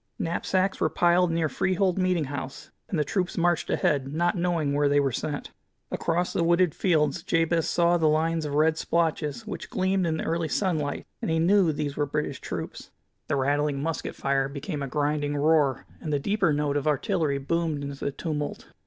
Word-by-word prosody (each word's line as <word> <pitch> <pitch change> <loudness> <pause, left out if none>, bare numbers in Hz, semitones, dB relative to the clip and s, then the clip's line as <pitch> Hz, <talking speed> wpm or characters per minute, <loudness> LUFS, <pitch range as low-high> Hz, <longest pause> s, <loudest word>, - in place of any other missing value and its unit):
Knapsacks 185 +3 0
were 160 - +3
piled 175 +2 +3
near 165 -1 +1
Freehold 185 +4 0
meeting 185 -3 +2
house, 135 -1 -6 0.2
and 180 - -1
the 150 - +2
troops 180 +5 -2
marched 175 -1 +1
ahead, 135 -2 +1
not 170 +3 +1
knowing 170 -5 0
where 145 0 +2
they 145 0 +4
were 140 -1 +1
sent. 145 +4 -4 0.4
Across 175 +2 -1
the 170 - +1
wooded 170 -1 +3
fields 165 -2 +1
Jabez 165 0 +1
saw 175 0 +3
the 160 -2 +3
lines 160 +1 +1
of 145 -1 -3
red 160 +1 +3
splotches 155 -6 -1
which - - -6
gleamed 190 -5 +1
in 160 -1 0
the - - -3
early 165 0 0
sunlight, 155 -5 -1 0.2
and - - -2
he 160 - +2
knew 180 +1 +4
these 145 -1 -3
were 145 -1 +1
British 145 -2 -3
troops. - - -6 0.4
The - - 0
rattling 145 +1 +1
musket 160 +3 -3
fire 135 0 0
became 145 +2 -5
a 140 - -2
grinding 145 +1 -1
roar, 145 -2 +2 0.2
and 155 - -4
the 145 - +2
deeper 190 +3 +1
note 145 -1 0
of 145 - -2
artillery 150 0 +1
boomed 155 +1 -1
into 140 -1 -6
the 140 - 0
tumult. 150 -1 -4
155 Hz, 190 wpm, -26 LUFS, 145-170 Hz, 0.4 s, they